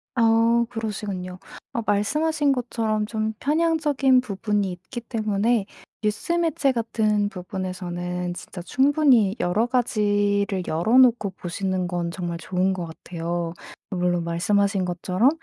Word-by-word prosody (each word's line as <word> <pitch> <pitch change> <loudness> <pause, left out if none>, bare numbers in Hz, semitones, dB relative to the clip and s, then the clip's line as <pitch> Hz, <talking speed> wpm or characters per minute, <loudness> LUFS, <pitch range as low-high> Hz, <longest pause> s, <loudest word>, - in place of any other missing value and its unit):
아 230 0 +4
그러시군요. 200 -5 -4 0.3
아 235 - -1
말씀하신 295 +9 +1
것처럼 225 -4 -1
좀 220 0 -2
편향적인 295 -4 +3
부분이 205 -3 -1
있기 190 +8 -8
때문에 220 -1 0 0.4
뉴스 215 +10 -1
매체 325 -5 +2
같은 215 -3 0
부분에서는 180 -1 -4
진짜 175 +1 -8
충분히 260 - +3
여러 190 +6 +1
가지를 205 -5 +1
열어 175 +10 +2
놓고 240 -6 +5
보시는 185 0 -3
건 175 -1 -2
정말 170 -1 -4
좋은 185 +2 0
것 180 -2 -4
같아요. 170 +1 -4 0.4
물론 180 -2 0
말씀하신 195 +3 +1
것처럼 180 +6 +2
205 Hz, 285 characters per minute, -24 LUFS, 180-235 Hz, 0.4 s, 놓고